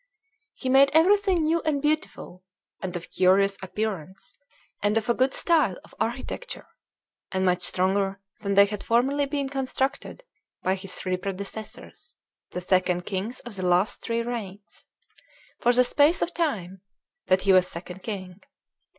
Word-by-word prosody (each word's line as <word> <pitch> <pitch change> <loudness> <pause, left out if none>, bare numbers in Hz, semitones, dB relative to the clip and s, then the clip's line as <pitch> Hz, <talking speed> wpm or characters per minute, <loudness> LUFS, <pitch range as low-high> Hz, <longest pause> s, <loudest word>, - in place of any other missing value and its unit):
"He 260 - -6
made 270 +2 +6
everything 380 +1 +4
new 325 +2 +2
and 305 -3 0
beautiful, 295 -11 -2 0.4
and 180 -2 -4
of 175 0 -7
curious 195 +2 +3
appearance, 190 -3 -5 0.5
and 205 +2 +2
of 220 - -1
a - - +5
good 260 +2 +2
style 310 - +2
of - - -20
architecture, 255 - -4 0.7
and 190 0 0
much 180 -1 +2
stronger 195 +2 +1 0.2
than 200 -2 -2
they 200 0 +8
had 205 0 -6
formerly 270 +5 +2
been 280 -1 -2
constructed 270 - -3 0.4
by 185 - +2
his 190 -1 -4
three 185 -1 -1
predecessors, 200 +3 -7 0.3
the 180 - -5
second 180 -1 +1
kings 205 +6 -4
of 240 -4 -9
the 185 - -4
last 180 +3 +2
three 230 0 -1
reigns, 210 -4 -7 0.7
for 245 - +4
the 250 +1 +4
space 290 +6 +3
of 345 - -3
time 195 - -2 0.5
that 185 0 +3
he 195 0 +4
was 185 -1 +5
second 180 +2 -8
king. 190 -3 -6
205 Hz, 150 wpm, -26 LUFS, 185-270 Hz, 0.7 s, they